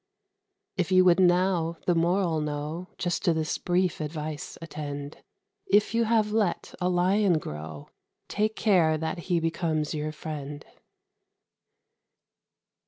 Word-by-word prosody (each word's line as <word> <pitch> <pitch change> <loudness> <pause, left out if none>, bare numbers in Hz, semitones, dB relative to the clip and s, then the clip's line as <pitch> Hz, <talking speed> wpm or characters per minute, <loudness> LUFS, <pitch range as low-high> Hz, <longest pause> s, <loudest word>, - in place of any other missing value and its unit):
If 180 0 -1
you 185 0 +6
would 180 0 +5
now 175 -2 +3
the 175 - +3
moral 170 -1 +1
know, 150 +4 -4
Just 175 -1 -2
to 170 -3 +3
this 155 -1 -1
brief 180 -2 0
advice 150 -1 -5
attend: 145 -3 -6 0.5
If 205 +3 +3
you 230 0 +2
have 220 -2 +2
let 210 -5 0
a 180 - +2
Lion 185 +1 +3
grow, 75 - -7 0.4
Take 215 +1 0
care 175 -7 +3
that 160 +2 -3
he 175 -2 +3
becomes 165 -2 -1
your 155 0 -2
friend. 150 -2 -7
170 Hz, 125 wpm, -27 LUFS, 155-185 Hz, 0.5 s, you